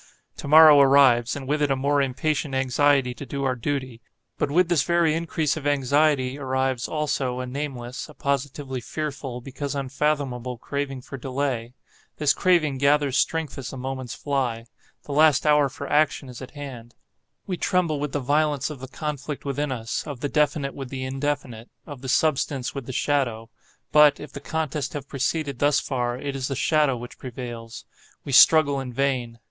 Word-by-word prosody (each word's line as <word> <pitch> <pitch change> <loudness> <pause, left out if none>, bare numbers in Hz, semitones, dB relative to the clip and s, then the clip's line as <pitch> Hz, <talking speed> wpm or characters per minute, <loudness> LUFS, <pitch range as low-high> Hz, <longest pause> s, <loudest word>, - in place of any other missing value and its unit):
To - - -7
morrow 155 0 +9
arrives, 135 -4 +5
and 135 -2 -7
with 150 +2 0
it 145 - +2
a 135 - +2
more 140 +2 +1
impatient 140 +1 -1
anxiety 135 0 +2
to 125 - -9
do 140 +1 -4
our 130 -1 +1
duty, 130 -1 -4 0.4
but - - 0
with 175 +4 +3
this 175 -3 +2
very 170 -2 +2
increase 160 -2 -1
of 150 -2 -4
anxiety 140 -1 +2
arrives, 130 -2 -1
also, 140 -5 -1
a 130 - -3
nameless, 130 -1 -5
a 150 - -14
positively 140 -1 -3
fearful, 135 -2 -5
because 140 +2 -5
unfathomable, 135 -3 -2
craving 135 +1 -4
for 140 - -8
delay. 130 -2 -3 0.4
This 145 -2 +3
craving 155 -7 +2
gathers 140 -1 +2
strength 160 -5 0
as 130 - -5
the 135 - -8
moments 130 -1 -5
fly. 125 -5 -2 0.4
The - - -9
last 155 0 +4
hour 150 -2 +4
for 140 +2 -7
action 145 -2 +1
is 125 0 -10
at 130 - -8
hand. 125 -5 -9 0.5
We 185 - -2
tremble 175 -5 0
with 145 -1 -3
the 145 - -1
violence 145 +1 +1
of 145 - -8
the 130 - -8
conflict 145 +1 -5
within 140 +1 -2
us,—of 120 +3 -4
the 145 - -2
definite 145 -2 +1
with 135 -2 -7
the 130 -1 -5
indefinite—of 135 -1 -5
the 130 - -6
substance 135 -2 +1
with 135 -4 -6
the - - -4
shadow. 120 -5 -1 0.4
But, 150 -1 +6
if 150 - -9
the - - -6
contest 150 -1 -3
have 145 -3 -6
proceeded 140 0 -2
thus 145 -1 +3
far, 120 -2 -2
it 140 +1 -4
is 130 -2 -2
the 135 - -3
shadow 150 -2 +2
which 120 +1 -10
prevails,—we 120 +1 -9
struggle 140 +1 +6
in 130 -2 -5
vain. 125 -3 -1
140 Hz, 175 wpm, -24 LUFS, 130-150 Hz, 0.5 s, morrow